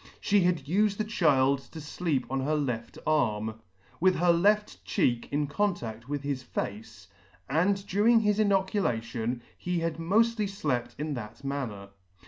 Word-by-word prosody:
She 205 0 +3
had 175 -6 +1
ufed 200 +6 +2
the 215 - 0
child 140 -10 +3
to - - -8 0.3
lleep 145 -7 +1
on 135 +1 -2
her 145 +4 0
left 125 -6 -3
arm, 110 -8 0 0.4
with 185 +1 +4
her 175 0 +4
left 210 +5 +2
cheek 120 - 0
in 145 +1 +1
contaff 140 - -2
with 145 0 -3
his 140 -2 -2
face, 105 -4 -6 0.4
and 195 +7 +1
during 220 +4 +4
his 210 -1 +1
inoculation 125 - 0
he 180 0 -2
had 165 -1 -2
moftly 215 +5 +2
llept 130 -11 -2
in 150 +1 -3
that 115 -1 -7
manner. 125 -8 -4
150 Hz, 150 wpm, -28 LUFS, 120-195 Hz, 0.4 s, with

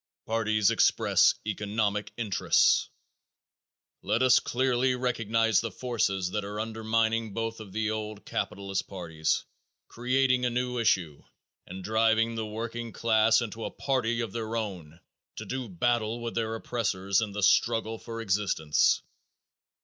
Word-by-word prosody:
Parties 110 -2 +2
Express - - +4
Economic 105 0 -1
Interests. 110 -5 +2 1.1
Let 120 - +1
us 130 -1 +6
clearly 130 0 +1
recognize 115 -3 +1
the 115 - -3
forces 95 -5 -1
that 105 +1 -2
are 105 +1 -5
undermining 110 0 -1
both 115 0 -3
of 105 -3 -10
the 110 +1 -1
old 105 -1 -5
capitalist 100 -1 -3
parties, 80 -5 -2 0.4
creating 125 +1 +1
a 125 - +2
new 125 0 -2
issue, 90 -9 +1 0.5
and 95 +1 -8
driving 110 +2 +2
the 110 -1 -3
working 115 +2 -5
class 110 +2 +3
into 115 0 -6
a - - -3
party 120 -4 -1
of 115 -4 -4
their 115 +1 -4
own 90 -8 -5 0.4
to - - -7
do 130 -3 -4
battle 115 +4 0
with 120 0 -4
their 115 -1 -1
oppressors 100 -5 -1
in 105 -2 -3
the 105 0 -3
struggle 115 +1 +2
for 115 -1 -7
existence. 95 -7 +1
110 Hz, 135 wpm, -28 LUFS, 105-115 Hz, 1.1 s, us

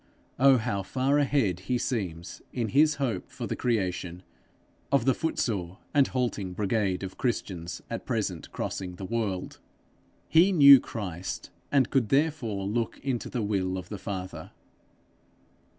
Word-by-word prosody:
Oh, 135 0 +7
how 110 -4 -1
far 135 +8 +1
ahead 130 - +1
he 125 - +2
seems, 95 -9 -3
in 115 -4 -2
his 150 +4 +4
hope 120 -10 -2
for 130 -2 -6
the - - -3
creation, 90 -6 -2 0.7
of 140 -4 +3
the 135 - +4
footsore 100 - -2 0.2
and 140 -2 +5
halting 115 -7 -2
brigade 100 -1 0
of 95 - -7
Christians 90 -8 -3
at - - -5
present - - -2
crossing 90 -2 -4
the 95 - -7
world! 105 -4 -3 0.7
He 170 +5 +5
knew 140 -6 +9
Christ, 95 -7 -6 0.2
and 135 -4 +3
could 130 -6 +2
therefore 135 -9 +1
look 115 +3 -1
into 130 -4 -2
the 120 -4 -2
will 95 -3 0
of 90 -1 -7
the 105 - -6
Father. 90 -5 -6
110 Hz, 145 wpm, -28 LUFS, 95-130 Hz, 0.7 s, knew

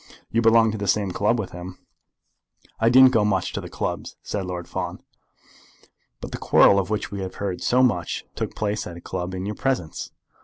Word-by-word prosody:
You 115 - +2
belonged 115 -1 +5
to 110 - -5
the 100 - -3
same 100 -1 +1
club 105 +6 +1
with 105 -5 -4
him." 90 +1 -8 1.0
"I 115 - +4
don't 130 +1 +8
go 110 -5 +3
much 95 -4 0
to - - -3
the - - -8
clubs," - - -4
said 95 -3 -3
Lord 90 -1 -5
Fawn. - - -5 1.2
"But - - -7
the - - -5
quarrel 100 - +5
of 95 -1 -2
which 105 -1 -2
we 100 - -5
have 95 -1 -5
heard 95 -3 -3
so 125 +1 +3
much 90 -9 0
took - - -4
place 105 0 -2
at 85 - -8
a - - -11
club 90 +1 -4
in 95 +1 -4
your 105 - -3
presence?" 120 - -2
100 Hz, 205 wpm, -24 LUFS, 90-115 Hz, 1.2 s, don't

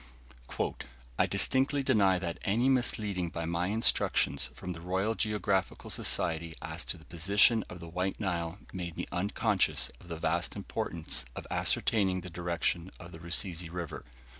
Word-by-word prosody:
"I - - +4
distinctly 135 +2 +3
deny 100 -7 +4
that 85 -2 -4
'any 115 +7 +2
misleading 105 -8 +1
by 85 0 -4
my 85 +2 -1
instructions 105 -8 +2
from 90 - -5
the 80 - -10
Royal 95 +5 0
Geographical 105 -3 -1
Society 80 -1 +1
as - - -5
to - - -5
the - - -17
position 100 +6 +4
of 90 - -8
the 85 - -9
White 90 +3 -2
Nile' 85 -4 -2 0.2
made 85 -3 -5
me - - -2
unconscious 100 +2 +1
of - - -16
the 85 -2 -5
vast - - -1
importance - - 0
of - - -6
ascertaining 95 -4 +2
the 90 0 -9
direction 85 0 -1
of 85 -1 -10
the 80 - -10
Rusizi 85 0 0
River. 85 -3 -5
90 Hz, 155 wpm, -31 LUFS, 85-105 Hz, 0.2 s, I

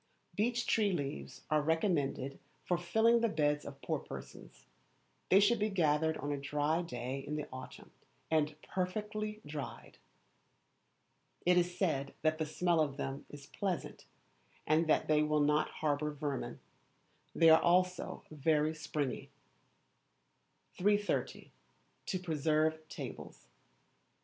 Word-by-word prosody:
Beech 240 +3 +1
tree 210 -3 +2
leaves 145 -5 -4
are 155 0 +4
recommended 150 -4 0 0.3
for 180 - +2
filling 220 +7 +3
the 230 - +3
beds 150 -3 +1
of 140 -1 -10
poor - - -1
persons. - - -10 0.6
They 190 - +7
should 215 +3 +4
be 210 +1 +1
gathered 160 -4 +2
on 145 - -3
a 145 - -2
dry 150 +3 0
day 130 -4 -4
in 145 +2 -5
the 150 -1 -3
autumn, 130 0 -9 0.4
and 155 -1 +1
perfectly 210 +3 -3
dried. 145 -1 -7 1.5
It 180 +1 +5
is 180 0 +1
said 140 -8 0
that 155 0 +2
the 155 - -1
smell 170 +2 +1
of 140 -3 -1
them 135 -1 -4
is 145 -1 -10
pleasant 190 +2 -4 0.6
and 160 +1 +3
that 155 - +3
they 150 -1 +4
will 150 0 +2
not 150 +1 +3
harbour 150 0 -1
vermin. 145 -2 -4 0.8
They 165 -1 +7
are 160 - +7
also 180 +1 +1
very 155 +1 +2
springy. 150 -4 -3 1.5
330. 205 +2 0 0.6
To 185 - -1
Preserve 155 -1 0
Tables. - - -8
155 Hz, 130 wpm, -34 LUFS, 145-180 Hz, 1.5 s, They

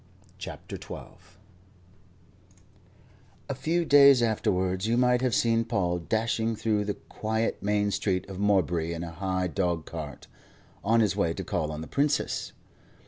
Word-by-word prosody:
CHAPTER - - -7
XII - - -8 2.4
A - - -2
FEW 160 +6 0
days 140 -4 +7
afterwards 95 -3 0
you 115 +1 +2
might 125 0 +3
have 125 -4 +1
seen 115 -1 +2
Paul 95 -7 0
dashing 110 +4 0
through 105 -1 0
the 105 - -2
quiet 110 +1 -3
main 105 0 +1
street 95 -2 -1
of 95 -1 -7
Morebury 90 -5 +1
in 85 - -5
a 85 - -6
high 95 +1 -2
dog 85 -3 -1
cart, 75 -5 -7 0.6
on 115 +4 +3
his 105 -3 +2
way 85 -5 0
to - - -4
call 80 -3 -2
on 75 0 -5
the 80 - -7
Princess. 145 +1 0
105 Hz, 145 wpm, -27 LUFS, 90-115 Hz, 2.4 s, days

